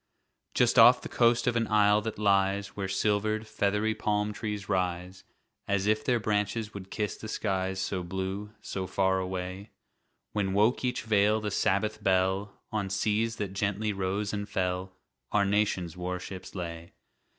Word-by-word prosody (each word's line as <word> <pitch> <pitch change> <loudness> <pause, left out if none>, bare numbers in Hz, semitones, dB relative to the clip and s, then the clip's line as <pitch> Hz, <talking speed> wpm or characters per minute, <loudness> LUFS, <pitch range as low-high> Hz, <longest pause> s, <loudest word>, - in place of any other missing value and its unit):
Just - - +4
off - - +9
the - - -4
coast 120 0 +3
of 125 - +1
an 115 -1 +1
isle 105 0 +4
that 110 0 -4
lies 100 -1 +2
Where 100 -2 -4
silver'd, 105 +2 0
feathery 105 0 0
palm 105 0 -1
trees 105 -3 -4
rise 90 -1 -2 0.4
As 100 -1 +1
if 110 +1 +2
their 120 -2 +2
branches 105 +1 -1
would 95 -2 -8
kiss 105 0 -3
the 110 - -8
skies 95 -3 -1
So 95 -1 -2
blue, 95 +3 -4
so 95 -1 -4
far 95 +1 +1
away; 95 +2 -4 0.6
When 100 -2 -1
woke 110 +7 +3
each 125 0 -1
vale 105 0 +3
the 105 -1 -3
Sabbath 105 +3 0
bell, 95 +1 +1
On 105 -3 -1
seas 105 +4 0
that 100 -3 -4
gently 105 +2 -1
rose 100 +2 -2
and 105 0 -3
fell, 90 0 -2 0.3
Our 100 -1 +3
nation's 100 -5 0
warships 90 +1 -6
lay. 85 -2 -6
100 Hz, 160 wpm, -29 LUFS, 95-105 Hz, 0.6 s, off